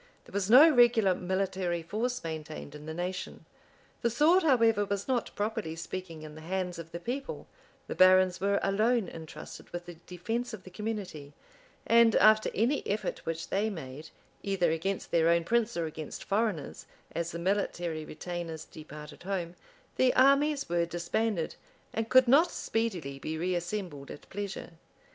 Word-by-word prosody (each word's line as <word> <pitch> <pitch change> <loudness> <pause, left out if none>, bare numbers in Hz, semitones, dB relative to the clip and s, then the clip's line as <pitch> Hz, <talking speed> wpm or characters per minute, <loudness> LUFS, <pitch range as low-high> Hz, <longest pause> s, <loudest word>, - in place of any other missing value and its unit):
There - - -17
was 200 0 -1
no 265 +8 +10
regular 240 - +5
military 185 -2 -2
force 235 +8 -2
maintained 155 -2 -6
in 150 +1 -10
the 160 - -4
nation: 180 +2 -5 0.6
the 235 - +2
sword, 310 +10 +4
however, 230 - +4
was 200 0 -3
not, 255 -3 0
properly 210 -6 -2
speaking, 165 -1 -6
in 155 -1 -9
the 155 - -11
hands 180 +1 -3
of 165 0 -9
the 170 - -5
people; 260 +9 -5 0.4
the - - -4
barons 185 0 +5
were 200 0 +2
alone 215 +2 +2
intrusted 160 -2 -10
with 175 0 -6
the 175 - -8
defence 220 +8 -4
of 190 - -15
the 185 - -12
community; 190 -9 -5 0.5
and 230 0 +5
after 215 0 +5
any 245 +7 +2
effort 205 +2 -2
which 165 0 -3
they 210 +3 +1
made, 155 -5 -8 0.3
either 190 -4 +1
against 185 +4 -2
their 165 0 +4
own 170 0 +3
prince 235 +3 +1
or 170 - 0
against 155 -1 -7
foreigners, 200 -8 -2 0.2
as 170 0 -2
the - - -5
military 175 -3 -1
retainers 165 0 -6
departed 150 -1 -11
home, 180 -2 -3 0.4
the 255 -1 +3
armies 280 +2 +4
were 170 0 +1
disbanded, 175 +2 -1 0.4
and 225 0 -2
could 255 -1 +6
not 305 +8 +6
speedily 180 -12 -3
be 160 +3 -4
reassembled 175 -3 -3
at - - -10
pleasure. 200 -2 -5
185 Hz, 160 wpm, -30 LUFS, 165-225 Hz, 0.6 s, no